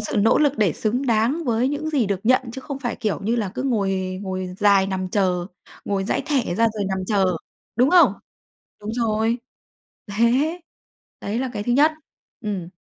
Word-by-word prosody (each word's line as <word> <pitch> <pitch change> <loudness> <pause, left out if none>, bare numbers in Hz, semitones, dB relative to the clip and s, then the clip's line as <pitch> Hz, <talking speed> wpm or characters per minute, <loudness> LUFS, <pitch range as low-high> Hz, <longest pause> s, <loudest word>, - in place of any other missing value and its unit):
sự 215 - -2
nỗ 215 +2 +4
lực 290 -3 +3
để 200 -7 +3
xứng 245 - -1
đáng 235 +8 +1
với 240 0 +1
những 300 +2 -3
gì 265 -8 +1
được 195 -1 -1
nhận, 255 +3 +4
chứ 265 - -6
không 275 +1 -6
phải 245 -3 -3
kiểu 215 -3 -2
như 225 +4 0
là 215 -5 -1
cứ - - -3
ngồi 195 -7 -1
ngồi 185 -1 -4
dài 200 -2 +4
nằm 190 -1 -3
chờ, 180 -3 0 0.4
ngồi 195 -1 -1
dãi - - 0
thẻ 260 -12 0
ra 230 +3 +3
rồi 205 -2 -2
nằm 190 -1 -1
chờ, 190 -4 +2 0.4
đúng 250 +5 +4
không? 360 -1 +6 0.7
Đúng 210 +1 -5
rồi, 225 0 0 0.7
thế! 255 - +2 0.6
Đấy 210 +3 -3
là 260 0 -2
cái 205 - -2
thứ 240 - 0
nhất. 300 +5 +5 0.5
Ừm. 190 -4 -4
220 Hz, 190 wpm, -22 LUFS, 195-255 Hz, 0.7 s, không